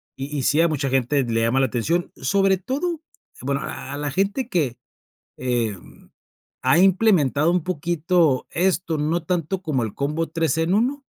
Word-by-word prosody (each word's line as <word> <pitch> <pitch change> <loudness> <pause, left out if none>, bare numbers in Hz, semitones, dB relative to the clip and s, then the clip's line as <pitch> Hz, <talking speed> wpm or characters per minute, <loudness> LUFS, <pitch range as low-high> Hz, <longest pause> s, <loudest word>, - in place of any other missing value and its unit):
y 140 +2 -6
y 140 - -1
sí 135 +4 +2
a 170 - +5
mucha 145 -4 -1
gente 135 +2 +1
le 115 -2 0
llama 115 +3 +2
la 135 - +3
atención, 165 +10 -1
sobre 195 -1 +2
todo, 295 - -3 0.4
bueno, 140 +1 -1
a - - -6
a - - -4
la 145 0 -2
gente 200 - -1
que, 145 - 0 0.6
eh, 120 -5 -1 0.9
ha 130 +5 +4
implementado 180 - +3
un 180 -2 +1
poquito 170 -4 +1
esto, 175 -1 0
no 160 +3 0
tanto 180 +1 -2
como 140 -6 -1
el 110 -3 -4
combo 150 +4 -2
3 160 -1 0
en 165 +3 +1
1, 265 +6 0
160 Hz, 170 wpm, -22 LUFS, 135-185 Hz, 0.9 s, a